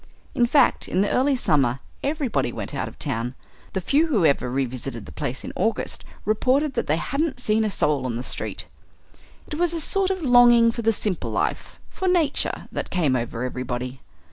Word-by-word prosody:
In 240 - +3
fact, 285 +4 +3
in 185 - +1
the 205 - +1
early 270 +2 +3
summer 140 - +2 0.2
everybody 285 -3 0
went - - -6
out - - -2
of - - -11
town. 125 -3 -3 0.4
The 190 - -1
few 290 - +2
who 220 - +2
ever 140 -4 +2
revisited 130 -2 -3
the - - -11
place 125 - -4
in - - -6
August 220 +3 -1 0.2
reported 260 +7 +2
that - - -2
they 150 - +2
hadn't 275 - -2
seen 220 -2 +2
a 215 - 0
soul 145 -8 +1
on 120 - -3
the 120 - -4
street. - - -2 0.8
It 300 - -6
was 345 -1 +2
a - - -1
sort 385 +5 +2
of 375 -3 -2
longing 240 -3 +6
for 235 - -4
the 225 0 +3
simple 205 -4 -1
life, - - -2
for 380 - -4
nature, 350 -5 +1
that - - -4
came 155 -8 +1
over 120 -1 -3
everybody. 125 +1 -4
215 Hz, 195 wpm, -24 LUFS, -, 0.8 s, longing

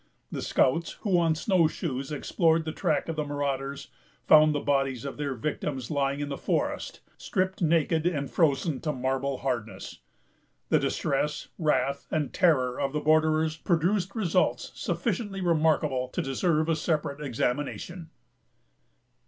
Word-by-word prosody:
The - - -4
scouts, 165 +6 +1
who 190 -5 +2
on 165 -2 +2
snowshoes 160 -6 0
explored 160 +2 +1
the 155 - -2
track 155 -2 0
of 165 - -3
the 155 - 0
marauders, 140 -1 -3 0.4
found 155 -1 +6
the - - +1
bodies 135 -3 0
of 140 - -5
their 145 -2 -2
victims 135 0 -3
lying 140 -1 0
in 145 - -3
the 140 - -4
forest, - - -2 0.2
stripped 190 0 -1
naked, 165 0 +2
and 145 -6 -1
frozen 150 -2 +1
to 155 -2 -2
marble 135 +1 -1
hardness. 125 -5 -4 0.7
The - - +4
distress, 150 +2 -1
wrath, 140 -3 0
and 150 -4 -1
terror 130 -8 +2
of 135 0 -1
the 150 - 0
borderers 155 +1 +2
produced 180 +3 0
results 185 -4 +1
sufficiently 205 -5 -2
remarkable 155 -6 +2
to - - -3
deserve 155 +3 +1
a 165 - +2
separate 150 -2 -1
examination. 145 +6 -3
150 Hz, 140 wpm, -27 LUFS, 135-165 Hz, 0.7 s, found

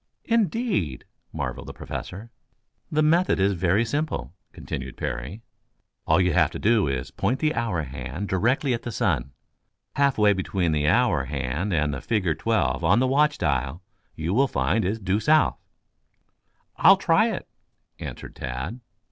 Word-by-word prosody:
"Indeed?" 215 - 0 0.3
marveled - - -5
the - - -8
Professor. 110 +6 -7 0.6
"The 155 +1 +2
method 170 - +3
is 100 +1 +3
very 95 +5 +2
simple," 145 +6 -3 0.2
continued - - -7
Parry. 80 - -5 0.6
"All 80 +3 +4
you 90 -2 +2
have 80 -4 +4
to - - -7
do 110 -5 +2
is 65 -2 -2
to - - -25
point 115 +7 0
the 155 +3 +1
hour 115 -9 -1
hand 65 +7 -6
directly 125 - +1
at 115 - -2
the 120 - -5
sun. 75 - 0 0.7
Half 140 -1 +2
way 105 -1 +5
between 95 -2 -1
the 75 -1 +1
hour 90 - +3
hand 70 +8 -3
and 75 -3 +1
the 70 - -5
figure 100 -8 0
twelve 110 +2 0
on 90 +7 +4
the 130 - +3
watch 145 +3 +2
dial 70 +5 -1 0.3
you 80 +3 -2
will 135 +5 +3
find 80 - 0
is 100 +5 -1
due 100 -1 0
south." 155 +6 +3 1.2
"I'll - - +7
try - - +3
it," - - -5 0.5
answered - - -8
Tad. 65 - -5
100 Hz, 160 wpm, -25 LUFS, 75-120 Hz, 1.2 s, I'll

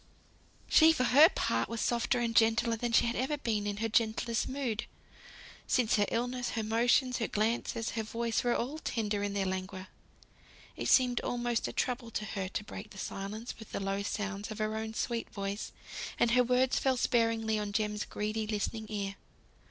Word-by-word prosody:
She, 320 0 +7
for 295 - 0
her 290 +6 +7
part, - - 0
was 230 - -4
softer 240 +3 +1
and 230 -1 -1
gentler 230 +1 +4
than 235 +1 -2
she 230 - +5
had 235 0 -1
ever 265 +4 -1
been 215 -6 -1
in 205 -1 -2
her 225 +2 0
gentlest 225 +1 +1
mood; 260 -5 -2 0.8
since 235 -3 +2
her 205 - +2
illness, 245 +1 -1
her 220 - 0
motions, 240 +3 +2
her 225 - 0
glances, 225 +1 -1
her 225 - -2
voice 230 +1 -1
were 240 -1 +2
all 280 +6 -2
tender 210 -7 -2
in 205 0 -2
their 200 -1 0
languor. 185 0 -4 0.9
It - - -2
seemed 250 -2 +4
almost 240 -1 -1
a - - -4
trouble 245 -2 -2
to 215 -1 -3
her 195 -3 -3
to 205 - -3
break - - -8
the 195 - -13
silence 210 +5 -5
with 220 - -12
the - - -1
low 195 0 -1
sounds 200 0 -3
of 215 - -6
her 215 0 -1
own 220 0 -4
sweet 235 0 -2
voice, 200 0 -4 0.5
and 235 - +3
her 250 +1 +5
words 250 +1 +2
fell 265 -1 +1
sparingly 230 -3 +1
on 210 -1 -3
Jem's 210 0 -1
greedy, 215 +1 -3
listening 215 +1 -2
ear. 200 -2 -3
225 Hz, 190 wpm, -31 LUFS, 210-240 Hz, 0.9 s, She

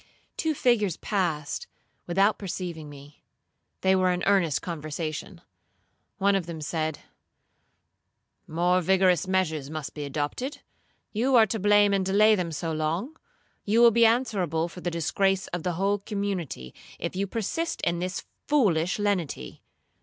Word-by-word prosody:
Two 320 -2 -1
figures 215 - +2
passed, 160 -7 -2 0.4
without 195 +4 +2
perceiving 175 -5 -5
me; 145 +1 -14 0.6
they 190 0 +4
were 185 -1 +3
in 180 0 -2
earnest 185 -7 +3
conversation. 155 +1 -5 0.8
One 200 +1 +3
of 185 -4 -1
them 165 -2 -6
said, 155 0 -3 1.5
'More 175 +3 +2
vigorous 185 0 +3
measures 160 -7 0
must 155 -2 -5
be 150 - -5
adopted. 145 - -3 0.5
You 250 +5 +1
are 225 -2 +7
to 220 +2 -3
blame 205 +1 +5
to 200 - +2
delay 200 +3 +4
them 180 -5 -1
so 165 +1 -3
long. 165 - -2 0.5
You 215 +3 +2
will 235 -1 +8
be 230 +1 +6
answerable 195 - +1
for 180 +1 -11
the 175 - -1
disgrace 185 +3 0
of 175 - -3
the 180 +2 -1
whole 200 +4 +1
community, 195 - -4 0.2
if 170 - -4
you 200 +1 -1
persist 230 - -2
in 170 0 +1
this 185 +1 -4 0.2
foolish 185 - +2
lenity.' 180 - -2
185 Hz, 145 wpm, -27 LUFS, 160-205 Hz, 1.5 s, will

